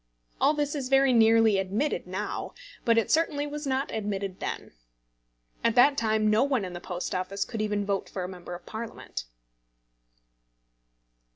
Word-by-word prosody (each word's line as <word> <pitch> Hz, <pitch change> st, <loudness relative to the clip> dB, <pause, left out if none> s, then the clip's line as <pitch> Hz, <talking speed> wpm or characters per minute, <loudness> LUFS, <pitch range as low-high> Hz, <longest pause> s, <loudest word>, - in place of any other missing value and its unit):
All 295 Hz, -, +4 dB
this 290 Hz, -1 st, -1 dB
is 275 Hz, -4 st, -3 dB
very 270 Hz, -1 st, +5 dB
nearly 225 Hz, -2 st, +5 dB
admitted 200 Hz, +7 st, -1 dB
now, 190 Hz, +3 st, -4 dB, 0.3 s
but 230 Hz, -1 st, +4 dB
it 230 Hz, -, +2 dB
certainly 310 Hz, -3 st, +2 dB
was 295 Hz, 0 st, -5 dB
not 265 Hz, +1 st, -1 dB
admitted 200 Hz, -3 st, -3 dB
then. -, -, -5 dB, 0.9 s
At 230 Hz, 0 st, +2 dB
that 275 Hz, +3 st, +6 dB
time 220 Hz, -3 st, +1 dB
no 215 Hz, +3 st, +4 dB
one 265 Hz, -7 st, +1 dB
in 180 Hz, -, -7 dB
the 175 Hz, -, -7 dB
Post 180 Hz, 0 st, -4 dB
Office 185 Hz, +2 st, -2 dB
could 225 Hz, -3 st, -4 dB
even 210 Hz, -1 st, -1 dB
vote 200 Hz, -1 st, -1 dB
for 185 Hz, -, -4 dB
a -, -, -3 dB
Member 180 Hz, -1 st, -8 dB
of 175 Hz, -, -12 dB
Parliament. 220 Hz, -, -6 dB
220 Hz, 165 wpm, -28 LUFS, 195-270 Hz, 0.9 s, that